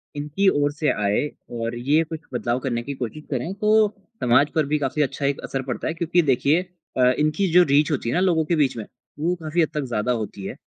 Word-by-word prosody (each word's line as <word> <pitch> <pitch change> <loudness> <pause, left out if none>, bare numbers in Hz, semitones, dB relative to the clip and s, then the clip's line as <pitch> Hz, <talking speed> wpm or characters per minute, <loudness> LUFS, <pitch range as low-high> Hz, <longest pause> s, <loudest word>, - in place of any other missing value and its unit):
इनकी 150 +7 -1 0.2
ओर 145 - +1
से 150 +1 0
आए 105 +7 0 0.3
और 115 +1 -3
ये 140 +7 +2
कुछ 160 0 -7
बदलाव 120 0 -1
करने 120 -3 -2
की 140 - -5
कोशिश 120 +6 -6
करें। 135 +7 -2
तो 215 +1 +3 0.4
समाज 130 +4 +4
पर 155 -2 +2
भी 150 +2 0
काफ़ी 145 +2 -1
अच्छा 140 0 -1
एक 140 0 0
असर 135 - -3
पड़ता - - -3
है। - - -1
क्योंकि 170 +1 +1
देखिए 145 +7 +2 0.4
अ, 125 -1 +5
इनकी 155 +6 +1
जो 180 0 +8
रीच 145 0 +3
होती 130 -5 -1
है - - -1
ना, 180 - +2
लोगों 170 -4 +2
के 170 - +1
बीच 140 -5 +1
में 110 - -5 0.3
वो 170 +4 0
काफ़ी 160 +2 0
हद 160 - +2
तक 150 - -1
ज़्यादा 105 +3 0
होती 105 -4 -4
है। - - -5
145 Hz, 235 wpm, -23 LUFS, 125-160 Hz, 0.4 s, जो